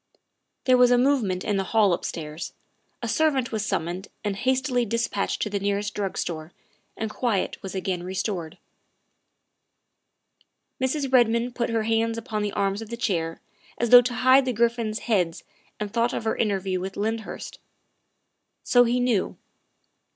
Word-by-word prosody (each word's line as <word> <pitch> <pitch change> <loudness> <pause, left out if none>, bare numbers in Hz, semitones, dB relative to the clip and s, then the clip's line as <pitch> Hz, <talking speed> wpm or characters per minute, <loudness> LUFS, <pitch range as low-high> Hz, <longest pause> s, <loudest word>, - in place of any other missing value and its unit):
' - - -53
' - - -54
There 255 -1 +5
was 250 -1 +7
a 245 - +5
movement 245 -9 +2
in 205 -2 0
the 195 - +1
hall 205 -2 +3
upstairs; 160 -2 -5 0.5
a - - -1
servant 275 -1 +1
was 220 -2 -1
summoned 185 -1 -2 0.2
and 205 -2 -1
hastily 260 +2 +1
dispatched 230 -2 -1
to 210 - -2
the 200 - -1
nearest 200 +1 -1
drug 200 -2 -3
store, 160 -1 -4 0.4
and 220 - -2
quiet 220 -4 -1
was 195 0 -7
again 185 -2 -2
restored. 185 -2 -3 2.2
Mrs. 275 +2 0
Eedmond 240 -1 +3
put 240 -1 -1
her 225 -1 0
hands 225 +1 +1
upon 225 -2 -3
the 205 -1 -1
arms 200 +1 0
of 225 - -8
the 235 - -5
chair 165 -8 -1 0.4
as 235 -1 -1
though 245 0 +11
to 245 0 -3
hide 260 +2 +5
the 255 - 0
griffins' 230 -1 0
heads 180 -8 0 0.4
and 210 -1 -4
thought 235 +1 +1
of - - -3
her 220 - 0
interview 195 -4 0
with 190 +1 -5
Lyndhurst. 220 +2 -4 1.0
So 245 -1 +5
he 240 +1 +1
knew. 245 -6 0
220 Hz, 165 wpm, -25 LUFS, 195-240 Hz, 2.2 s, though